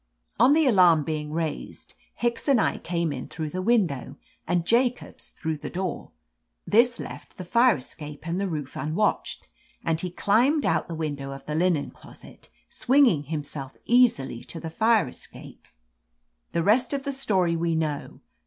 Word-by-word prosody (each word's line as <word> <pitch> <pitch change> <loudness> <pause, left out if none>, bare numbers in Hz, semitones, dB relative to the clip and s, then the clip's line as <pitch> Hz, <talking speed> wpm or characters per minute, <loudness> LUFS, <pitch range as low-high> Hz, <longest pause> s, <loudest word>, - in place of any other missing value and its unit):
"On 250 +5 +6
the 315 0 +4
alarm 180 - +5
being 150 -1 -4
raised. 160 -1 -4 0.2
Hicks 235 +2 -1
and 275 -4 +4
I - - +1
came 170 -3 -2
in 130 -2 -6
through 155 -2 -5
the 185 - -3
window, 180 - 0 0.3
and 175 0 +1
Jacobs 245 +4 0
through 160 -1 -4
the 145 0 -7
door. 185 +1 -4 0.6
This 235 +2 +3
left - - -9
the 185 - -6
fire 235 +6 +4
escape 150 +4 -9
and 175 +3 -1
the 200 - 0
roof 150 -6 -5
unwatched, 165 +8 -1 0.4
and 165 0 0
he 180 - -3
climbed 240 - +2
out - - +1
the 165 - -5
window 145 -4 -4
of 135 0 -9
the 150 - -4
linen 165 -2 +1
closet, - - -13 0.2
swinging 250 - +3
himself 145 -2 -5
easily 225 - +3
to 165 - -6
the 160 0 -6
fire 220 - +3
escape. - - -11 0.9
"The 170 - +1
rest 240 - +3
of 275 -1 -2
the 280 - -3
story 190 -10 +1
we 165 0 0
know. 155 -3 -3
170 Hz, 165 wpm, -25 LUFS, 155-235 Hz, 0.9 s, On